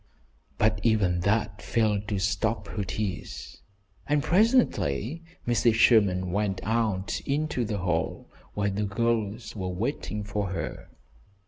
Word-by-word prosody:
But 110 0 +2
even 100 -6 +2
that 100 +2 0
failed 105 -3 0
to 105 - -1
stop 100 +4 0
her 105 - -2
tears, 100 -1 -5 0.5
and 150 -1 +2
presently 170 - +2 0.2
Mrs. 120 -1 +3
Sherman 100 -6 +4
went 100 -1 0
out 110 -4 0
into 145 -2 0
the 105 -2 -2
hall, 90 -3 -1 0.3
where 100 -1 0
the 105 +2 -1
girls 115 +1 -1
were 95 -3 -3
waiting 105 +2 -3
for 105 -1 -2
her. 85 - -5
105 Hz, 125 wpm, -27 LUFS, 95-115 Hz, 0.5 s, Sherman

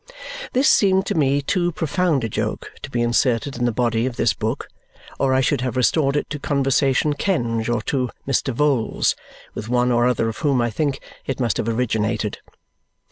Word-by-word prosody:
This 260 +3 +3
seemed 190 -1 +4
to - - -1
me 140 -2 +2
too 175 +3 0
profound 165 -3 0
a - - 0
joke 110 - -3
to - - -7
be 120 -1 0
inserted 120 +2 +1
in 120 0 -1
the 120 - +2
body 115 0 0
of 125 - -4
this - - +2
book - - -3 0.5
or 135 - +2
I 130 0 +3
should 135 -1 +1
have 125 0 -2
restored 140 +2 +2
it 145 - 0
to 145 - -3
Conversation 140 +1 +1
Kenge 120 - -1
or 120 -2 0
to 130 -2 -1 0.2
Mr. 135 0 +1
Vholes, 135 -2 +1 0.4
with 110 - -6
one 125 0 +2
or 120 0 +3
other 120 -2 +1
of 110 - -4
whom 140 -5 +2
I 120 -1 +1
think 140 +4 -1 0.3
it 135 - -2
must 120 -4 0
have 115 - -1
originated. 110 -2 -1
130 Hz, 190 wpm, -21 LUFS, 120-145 Hz, 0.5 s, seemed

